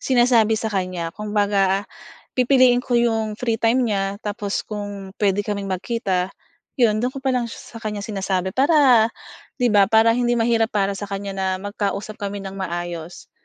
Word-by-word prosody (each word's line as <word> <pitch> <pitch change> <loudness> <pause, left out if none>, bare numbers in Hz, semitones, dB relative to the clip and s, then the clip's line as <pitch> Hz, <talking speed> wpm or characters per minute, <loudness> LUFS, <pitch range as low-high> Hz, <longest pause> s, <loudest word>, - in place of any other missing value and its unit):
sinasabi 240 -4 +3
sa 220 -1 -3
kanya 180 -3 -2
kumbaga 205 -2 +1 0.5
pipiliin 250 -1 +4
ko 240 -2 +2
'yong 225 -2 0
free 235 -2 0
time 230 +3 +2
niya 200 -1 -1
tapos 205 -1 -3
kung 205 -2 -6
puwede 200 -1 +1
kaming 200 -2 -3
magkita, 190 -2 -2 0.4
'yon 220 -5 +3
do'n 250 +3 -2
ko 270 - -7
pa 265 - +2
lang 245 -2 0
sa 230 0 -10
kanya 210 -2 -4
sinasabi 190 -3 -2
para 265 - +5 0.5
'di 245 -3 +1
ba, 200 -2 +5
para 225 +1 +5
hindi 240 0 +1
mahirap 230 -1 +2
para 200 -1 +1
sa 200 +1 -5
kanya 200 0 -4
na 190 0 -3 0.2
magkausap 205 0 -3
kami 200 0 -4
ng 195 0 -7
maayos, 175 -2 -5
210 Hz, 165 wpm, -22 LUFS, 195-235 Hz, 0.5 s, para